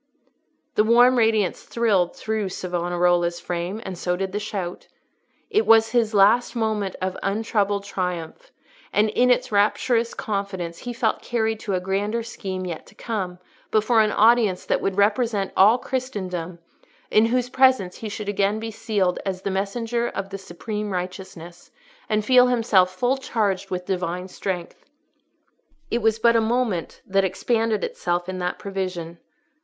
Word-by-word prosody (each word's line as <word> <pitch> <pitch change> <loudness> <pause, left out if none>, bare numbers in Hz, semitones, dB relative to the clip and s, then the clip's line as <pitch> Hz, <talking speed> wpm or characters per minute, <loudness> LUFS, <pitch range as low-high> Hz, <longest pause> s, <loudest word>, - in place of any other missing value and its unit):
The 210 - +3
warm 240 +3 +5
radiance 220 -5 +2
thrilled 200 -7 +1
through 215 -3 -2
Savonarola's 175 -1 0
frame, 175 +4 -4
and 190 - -5
so 180 +1 -1
did 190 +1 -3
the 205 - -2
shout. 195 -4 -5 0.6
It 430 +1 +2
was 225 0 +6
his 225 -3 +1
last 210 +6 +4
moment 215 -4 -1
of 185 0 -1
untroubled 205 -1 0
triumph, 180 - -4 0.4
and 215 +1 +3
in 250 +3 +3
its 250 - +2
rapturous 230 +3 +2
confidence 195 -5 -4
he 245 - -5
felt 230 -2 0
carried 225 -2 -1
to 200 -3 -2
a - - +1
grander 200 +5 -1
scene 190 -5 -5
yet 170 -3 -6
to - - -18
come, 190 -6 -4 0.3
before 220 +1 +3
an 215 -1 +2
audience 220 -4 +3
that - - 0
would 195 0 -1
represent 205 -1 +1
all 210 +5 +6
Christendom, 185 -11 -4 0.5
in 220 +1 +5
whose 250 +1 0
presence 260 -9 +3
he 220 - -6
should 210 0 -6
again 205 +1 +1
be 225 0 -5
sealed 205 -5 -1
as 190 -1 -4
the 195 - -1
messenger 230 +5 -1
of 195 -3 -5
the 195 - -5
supreme 210 +3 -5
righteousness, 180 -2 -7 0.4
and 215 0 +1
feel 250 0 +6
himself 225 -7 +3
full 245 +8 0
charged 210 -7 -1
with 180 -1 -4
Divine 180 -1 -2
strength. 180 -2 -5 1.1
It 235 - 0
was 220 0 +2
but 235 +1 +4
a 230 - +4
moment 225 -6 -1
that 195 0 +2
expanded 220 +3 0
itself 175 0 -2
in 185 0 -4
that 180 0 -2
prevision. 185 -4 -5
205 Hz, 155 wpm, -23 LUFS, 185-225 Hz, 1.1 s, was